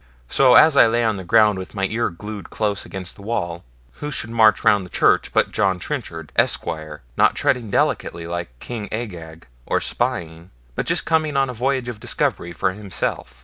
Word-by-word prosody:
So 130 -2 +5
as 160 -2 +7
I 130 - +7
lay 120 +1 +1
on 110 -2 +1
the 95 - -6
ground 105 +1 +4
with 95 +3 -9
my 95 -1 0
ear 115 +4 -1
glued 105 +3 -8
close 105 -2 -2
against 95 -2 -7
the - - -14
wall, 85 -6 -3 0.4
who 150 - -3
should 115 -5 -2
march 110 -2 +4
round 100 -2 +4
the 90 - -11
church - - +2
but - - +2
John 95 -3 +1
Trenchard, 85 - -5
Esquire, 75 -3 -1
not - - +4
treading 120 -4 0
delicately 85 -3 0
like 85 0 -4
King 110 - -7
Agag, 85 -8 -6 0.2
or - - +1
spying, 90 -9 -3 0.2
but - - -3
just - - +1
come 160 -1 +2
on 135 -1 +2
a - - -8
voyage 130 +1 -1
of 120 -3 -6
discovery 85 - -1
for 95 +2 -1
himself. 90 -10 -4
105 Hz, 190 wpm, -21 LUFS, 85-120 Hz, 0.4 s, as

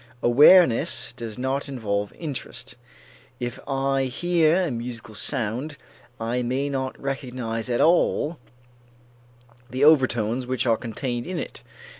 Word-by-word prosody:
Awareness 135 0 +5
does 115 -3 -6
not 135 +3 -2
involve 105 -6 -2
interest. 150 -6 -6 0.7
If 120 -1 -4
I 135 -1 0
hear 170 +5 +2
a 160 - -2
musical 115 -2 -6
sound, 130 +5 -2 0.4
I 115 +2 -1
may 130 +4 -1
not 130 -1 -3
recognize 125 -4 -4
at 120 - +1
all 165 -2 +2 1.3
the 130 +3 -1
overtones 125 -5 +3
which 130 0 -1
are 115 -2 +4
contained 120 +1 -4
in 185 -1 -4
it. - - -6
130 Hz, 120 wpm, -24 LUFS, 120-140 Hz, 1.3 s, Awareness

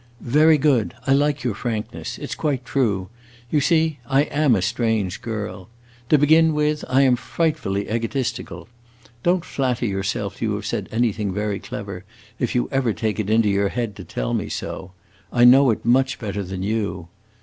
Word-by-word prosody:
"Very 155 +1 +6
good. 135 -6 +2
I 135 - +3
like 145 +1 +1
your 120 -4 0
frankness. 110 +1 -4
It - - -7
's - - 0
quite 135 -5 -2
true. 105 -9 0 0.4
You 150 - +3
see, 160 -1 +2
I 135 +2 +3
am 145 -4 +2
a 95 - 0
strange 110 -3 -1
girl. 105 -3 -5 0.4
To 150 - +6
begin 160 +2 +4
with, 150 0 0
I 135 +2 +4
am 130 -2 +4
frightfully 120 -9 -1
egotistical. 115 +2 -3 0.5
Don't 175 +3 +1
flatter 125 -6 -1
yourself 100 0 -3
you 110 -3 0
have 105 0 -5
said - - -3
anything 110 -3 0
very 105 +1 -2
clever 100 -3 -7 0.4
if 125 - -1
you 120 - +1
ever 130 -5 +1
take 110 0 -2
it 105 -1 -2
into 110 0 +3
your 100 0 +1
head 115 -3 -3
to 95 - -8
tell - - -3
me - - -2
so. 95 0 -5 0.4
I 120 0 +4
know 130 +2 +7
it 110 - -1
much 130 +3 +3
better 105 -3 -4
than 95 0 -5
you. 100 -5 -2
115 Hz, 180 wpm, -22 LUFS, 105-135 Hz, 0.5 s, know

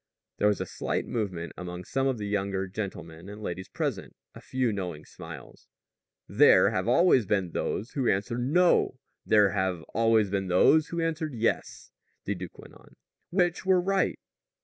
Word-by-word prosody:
There 105 - +3
was 105 -2 +1
a - - -2
slight - - -3
movement 90 -8 -4
among 90 0 -7
some 135 0 0
of 130 -2 0
the 105 - -5
younger 100 -1 -1
gentlemen 95 -3 -7
and 105 +1 -9
ladies 95 -3 -5
present - - -4 0.2
a - - -12
few 130 -4 -1
knowing 90 -6 -5
smiles. - - -11 0.6
"There - - +5
have 95 +2 -2
always 130 - +4
been 95 -4 0
those 110 +7 -3
who 135 -4 0
answered 100 +5 -1
No; 170 +8 +3 0.3
there 105 -2 +5
have 95 -4 -1
always 115 -3 +3
been 95 -1 -1
those 150 - +4
who 170 - -4
answered 160 -3 -2
Yes," 115 0 -2 0.3
the - - -1
duke - - -8
went - - -13
on. - - -19 0.3
"Which 175 -1 +1
were 190 -1 +4
right?" 195 +2 0
105 Hz, 170 wpm, -27 LUFS, 95-135 Hz, 0.6 s, There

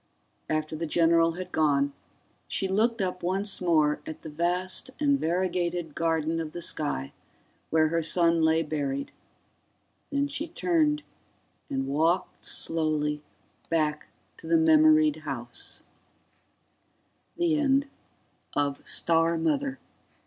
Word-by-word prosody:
After 155 0 -1
the 165 +1 -3
general 165 +1 +3
had 180 +1 -7
gone, 140 -2 +2 0.5
she 195 - -1
looked 220 +4 +1
up 180 -1 -3
once 190 +3 0
more 155 -4 +2
at 155 - -8
the 160 - -7
vast 180 - -1
and 285 -2 +2
variegated 175 -1 -1
garden 165 0 0
of 160 -1 -5
the 175 - -6
sky 70 - -2 0.6
where 155 -1 +3
her 165 +1 0
son 165 +1 +3
lay 160 +1 +3
buried, 140 -3 -3 1.0
then 280 -1 0
she 290 +3 -4
turned 315 -3 +1 0.7
and 135 0 -1
walked 160 +6 0
slowly 155 -2 -1 0.5
back 155 -2 0 0.3
to - - -11
the 165 0 +4
memoried 155 -1 +5
house. 125 -6 -5
165 Hz, 105 wpm, -27 LUFS, 155-180 Hz, 1.0 s, memoried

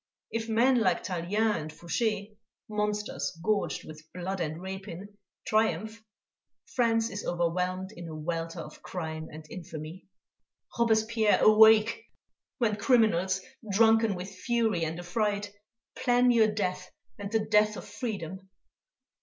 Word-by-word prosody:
If 230 0 -3
men 245 +3 +4
like 185 -6 +1
Tallien 205 +5 0
and 155 +1 -7
Foucher, 200 +6 -1 0.4
monsters 210 -7 -2
gorged 210 0 0
with 155 0 -11
blood 185 +2 -3
and 160 -1 -3
rapine, 190 0 -7 0.4
triumph, 220 +1 0 0.6
France 230 -2 +1
is 200 +1 -5
overwhelmed 180 +2 -1
in 170 -1 -8
a 160 - -7
welter 165 +1 -3
of - - -11
crime 160 -3 -5
and 155 0 -10
infamy... 165 0 -8 0.7
Robespierre, 220 -1 +3
awake; 220 - +6 0.5
when 225 -5 +1
criminals, 200 -6 +3 0.3
drunken 225 0 +4
with 180 +2 -6
fury 220 -3 0
and 160 +1 -4
affright, 205 +3 -1 0.4
plan 245 0 +3
your 225 -2 +5
death 185 -3 -2 0.3
and 200 0 -5
the 220 -1 +1
death 210 0 +3
of - - -8
freedom! 195 -4 -5
205 Hz, 125 wpm, -29 LUFS, 175-220 Hz, 0.7 s, awake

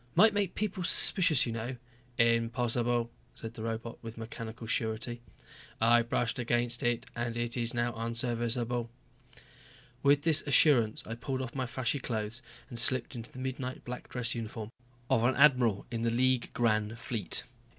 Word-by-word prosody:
"Might 220 0 +6
make 205 -3 -1
people 200 -3 -2
suspicious, 165 -5 +5
you 120 - -3
know." 115 +3 -4 0.4
"Impossible," 115 0 +1 0.3
the 115 0 -7
robot 115 +1 -4
said - - -35
with 115 0 -8
mechanical 115 0 -7
surety. 115 +1 -2 0.6
"I 120 +1 +5
brushed 120 +1 -1
against 120 0 0
it 120 +1 0
and 120 0 -3
it 120 0 -2
is 120 -1 -2
now 120 0 0
unserviceable." 115 +1 -1 1.1
With 145 +1 +4
this 155 -2 +4
assurance 130 -7 +5
I 115 - -5
pulled 130 +3 -3
off 120 - -7
my 130 -2 -2
flashy 130 +2 -1
clothes 110 -1 -3 0.3
and 120 - -4
slipped 130 +1 +1
into 115 0 -7
the - - -13
midnight 130 0 -5
black 125 0 -7
dress 125 -2 -2
uniform 110 -1 -6 0.4
of 115 - +2
an 130 +2 +3
admiral 125 -8 +4
in 115 -1 -3
the 115 - +1
League 125 +1 +1
Grand 110 -3 +1
Fleet. 110 -5 -1
120 Hz, 160 wpm, -31 LUFS, 115-130 Hz, 1.1 s, Might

